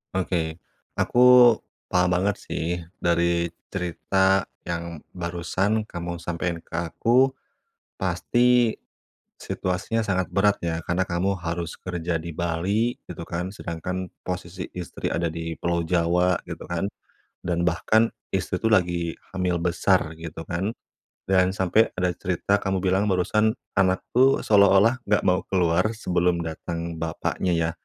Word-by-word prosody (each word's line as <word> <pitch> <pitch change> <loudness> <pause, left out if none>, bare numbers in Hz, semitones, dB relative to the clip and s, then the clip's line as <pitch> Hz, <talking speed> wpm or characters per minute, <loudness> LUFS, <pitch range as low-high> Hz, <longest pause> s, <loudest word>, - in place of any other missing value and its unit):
Oke. 85 -3 -1 0.4
Aku 125 -1 +7 0.3
paham 90 0 +2
banget 100 +2 +1
sih, 85 +2 -3 0.2
dari 85 0 +2 0.2
cerita 95 +1 +1 0.2
yang 85 -2 -4 0.2
barusan 90 +5 -1
kamu 85 0 -5
sampein 85 0 -3
ke 80 - -21 0.2
aku, 130 +3 +3 0.7
pasti 120 +6 +2 0.6
situasinya 95 +5 -2
sangat 95 -4 -1
berat 100 +1 +3
ya, 85 -1 -1
karena 85 +2 0
kamu 95 +2 0
harus 85 0 -3
kerja 85 -2 -3
di 85 +1 -5
Bali 90 +8 0
gitu - - -9
kan. 90 +3 -3
Sedangkan 90 0 -4 0.2
posisi 90 0 -5
istri 90 -1 -4
ada 85 0 0
di 80 0 -5
Pulau 85 -1 0
Jawa 90 +1 +2
gitu - - -7
kan, 85 +3 -2 0.5
dan 85 0 -1
bahkan 110 +6 +2 0.2
istri - - -2
tuh 110 - +2
lagi 85 -5 +1 0.2
hamil 90 -2 0
besar 85 -2 +1
gitu 80 0 -7
kan, 90 +5 -2 0.6
dan 95 -1 +3
sampai 95 +5 +3
ada 90 -1 +1
cerita 95 +3 0
kamu 95 -1 -1
bilang 95 +3 +2
barusan, 105 +4 +2 0.2
anakku 100 +8 +2
seolah-olah 100 +4 +5
enggak 105 - +2
mau 90 -1 +3
keluar 90 +4 +2
sebelum 90 -4 0
datang 85 +1 -5
bapaknya 80 +2 -1
ya, 85 0 +1
90 Hz, 130 wpm, -25 LUFS, 85-100 Hz, 0.7 s, Aku